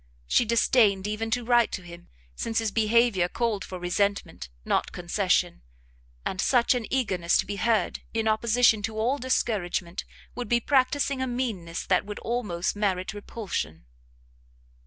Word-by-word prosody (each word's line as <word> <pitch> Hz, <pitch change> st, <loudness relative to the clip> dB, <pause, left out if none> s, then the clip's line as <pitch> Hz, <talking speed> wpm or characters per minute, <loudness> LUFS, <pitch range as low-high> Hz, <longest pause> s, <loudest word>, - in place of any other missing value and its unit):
She 150 Hz, -, +3 dB
disdained 215 Hz, -3 st, +3 dB
even 215 Hz, +2 st, -2 dB
to 240 Hz, +1 st, -1 dB
write 240 Hz, -1 st, +4 dB
to 190 Hz, -, -4 dB
him, 175 Hz, 0 st, -12 dB, 0.3 s
since 225 Hz, -1 st, -3 dB
his 225 Hz, -2 st, +1 dB
behaviour 220 Hz, -4 st, +3 dB
called 225 Hz, -3 st, -1 dB
for 185 Hz, -, -7 dB
resentment, 200 Hz, -, -1 dB, 0.2 s
not -, -, 0 dB
concession; -, -, 0 dB, 0.6 s
and 190 Hz, -, -2 dB
such 245 Hz, +1 st, +3 dB
an 245 Hz, -3 st, -3 dB
eagerness 190 Hz, -10 st, +1 dB
to -, -, 0 dB
be 205 Hz, -, -5 dB
heard, 220 Hz, -2 st, +1 dB
in 225 Hz, 0 st, -1 dB
opposition 220 Hz, 0 st, +3 dB
to 220 Hz, +1 st, -4 dB
all 250 Hz, +6 st, +1 dB
discouragement, 190 Hz, -8 st, -1 dB, 0.3 s
would 245 Hz, -1 st, -5 dB
be 240 Hz, -1 st, +3 dB
practising 270 Hz, +1 st, +1 dB
a 260 Hz, -, 0 dB
meanness 225 Hz, -10 st, -3 dB
that 185 Hz, -, +2 dB
would 205 Hz, 0 st, -7 dB
almost 210 Hz, -8 st, -2 dB
merit 190 Hz, -3 st, -1 dB
repulsion. 180 Hz, -, -5 dB
220 Hz, 150 wpm, -26 LUFS, 190-240 Hz, 0.6 s, write